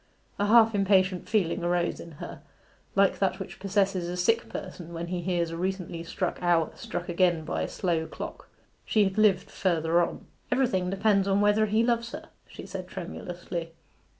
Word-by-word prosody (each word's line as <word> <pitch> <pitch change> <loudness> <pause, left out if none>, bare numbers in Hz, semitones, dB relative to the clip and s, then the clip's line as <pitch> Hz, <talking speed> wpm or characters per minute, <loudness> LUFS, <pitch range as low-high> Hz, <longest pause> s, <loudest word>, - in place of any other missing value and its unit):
A 205 - +2
half 225 0 +6
impatient 190 -2 +2
feeling 185 -5 +1
arose 175 0 0
in 170 - -10
her, 150 - -8 0.5
like - - +3
that - - +1
which - - -8
possesses 195 -3 0
a 180 - -4
sick 225 +6 +2
person 175 -3 -7
when 170 0 -4
he 180 -1 -2
hears 170 -2 0
a 165 - -5
recently 180 -2 -3
struck 180 +1 -3
hour 175 -2 +2
struck 175 0 -5
again 175 -2 +2
by 175 - -2
a - - -1
slow 165 -4 -1
clock. - - -8 0.3
She 215 - +3
had 195 +1 0
lived 200 -4 +3
further 170 -2 +2
on. 170 - -3 0.3
'Everything 235 -8 +1
depends 195 0 +2
upon 195 +1 +3
whether 210 +1 +4
he 215 +2 +2
loves 235 +1 0
her,' 315 +1 -8 0.2
she - - -10
said - - -6
tremulously. 175 -1 -6
185 Hz, 180 wpm, -28 LUFS, 175-205 Hz, 0.5 s, half